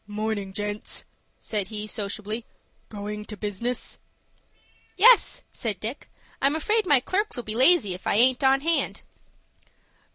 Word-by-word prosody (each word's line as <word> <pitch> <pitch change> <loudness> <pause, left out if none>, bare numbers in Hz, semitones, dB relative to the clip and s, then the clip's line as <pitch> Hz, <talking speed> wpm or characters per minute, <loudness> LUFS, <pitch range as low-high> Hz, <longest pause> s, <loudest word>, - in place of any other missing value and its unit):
"Morning, 210 -2 -3
gents," 205 +1 -4 0.4
said 205 -3 -2
he, 210 0 -4
sociably. 215 +1 -4 0.5
"Going 210 0 -6
to 210 - -8
business?" 215 +4 -3 1.0
"Yes," 465 +5 +5
said 210 -6 -4
Dick. 230 +8 -6 0.3
"I'm 275 +2 +3
afraid 425 +6 +1
my 285 -5 +6
clerks'll 375 - -2
be 215 - -4
lazy 255 - +5
if 180 - -8
I - - +2
aint 250 +4 +4
on 270 0 +4
hand." 330 +2 0
220 Hz, 130 wpm, -25 LUFS, 210-275 Hz, 1.0 s, my